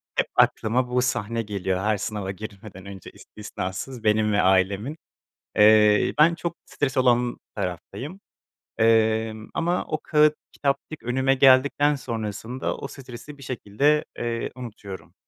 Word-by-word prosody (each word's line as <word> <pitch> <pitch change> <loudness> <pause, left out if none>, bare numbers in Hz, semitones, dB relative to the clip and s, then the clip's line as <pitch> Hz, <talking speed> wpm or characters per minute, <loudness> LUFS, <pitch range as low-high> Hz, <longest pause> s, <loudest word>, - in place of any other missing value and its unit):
Hep - - +1
aklıma 125 +3 +2
bu 125 0 +1
sahne 115 -2 -1
geliyor, 95 -3 -2
her 105 +2 +1
sınava 100 -2 -4
girmeden 100 -1 -10
önce 100 -2 -10
istisnasız 105 +4 -7
benim 105 0 +2
ve 100 - +3
ailemin. 95 - +1 0.6
Eee, 105 0 +5
ben 165 +3 +6
çok 170 0 -5
stres 140 -2 -2
olan 125 -1 +2 0.2
taraftayım. 130 - -5 0.6
Emm, 110 -1 +2
ama 175 +2 0
o 155 - -3
kâğıt 150 0 +4 0.2
kitapçık 140 +2 -3
önüme 130 +2 +1
geldikten 140 +2 +4
sonrasında 115 0 -4
o 140 - -6
stresi 135 +2 -11
bir 135 - -12
şekilde, 135 +5 +1
eee, 115 -1 -3
unutuyorum. 105 -6 -9
115 Hz, 130 wpm, -24 LUFS, 105-135 Hz, 0.6 s, ben